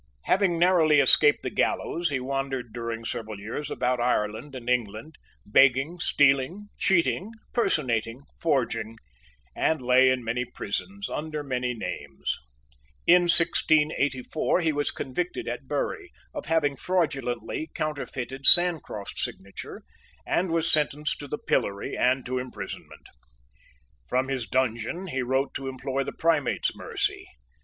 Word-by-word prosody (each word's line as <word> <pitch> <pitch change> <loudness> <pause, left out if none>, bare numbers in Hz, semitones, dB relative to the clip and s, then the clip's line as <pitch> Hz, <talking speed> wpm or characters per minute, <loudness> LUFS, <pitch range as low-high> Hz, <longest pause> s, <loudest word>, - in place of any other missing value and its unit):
Having 185 -3 +2
narrowly 165 -4 +4
escaped 145 +2 +5
the - - -3
gallows, 170 0 0
he 140 -2 -1
wandered 135 -3 -3
during 115 -1 -5
several 110 -3 -5
years 115 +8 -5
about 125 0 -1
Ireland 120 +3 -1
and 125 -2 -8
England, 120 +4 -2 0.3
begging, 135 +9 +3
stealing, 145 +9 +2
cheating, 190 +1 +1 0.2
personating, 125 - 0 0.2
forging, 120 -7 -1 0.6
and 160 -1 +1
lay 130 +1 +5
in 130 -1 0
many 115 +2 -1
prisons 160 - -5
under 150 -1 -4
many 125 -2 -2
names. 70 -10 -4 0.7
In 175 0 +6
1684 155 -3 +4
he 160 -2 +2
was 145 -1 0
convicted 175 - -4
at - - -5
Bury 420 -6 -3 0.2
of 295 -3 -6
having 150 -4 +1
fraudulently 140 -4 -2
counterfeited 135 -3 -3
Sancroft's 165 - +4
signature, 100 +1 -7 0.4
and 180 +1 0
was 165 0 +1
sentenced 150 0 0
to 145 - -7
the 150 - -4
pillory 100 0 -1
and 130 +1 +1
to 130 +1 -2
imprisonment. 110 -6 -8 1.0
From 130 +1 0
his 130 -5 -2
dungeon 130 - -1
he 135 -3 -2
wrote 130 +2 0
to 135 - -5
implore 135 +1 -3
the - - -5
Primate's 160 -3 0
mercy. - - -3
135 Hz, 130 wpm, -26 LUFS, 125-160 Hz, 1.0 s, In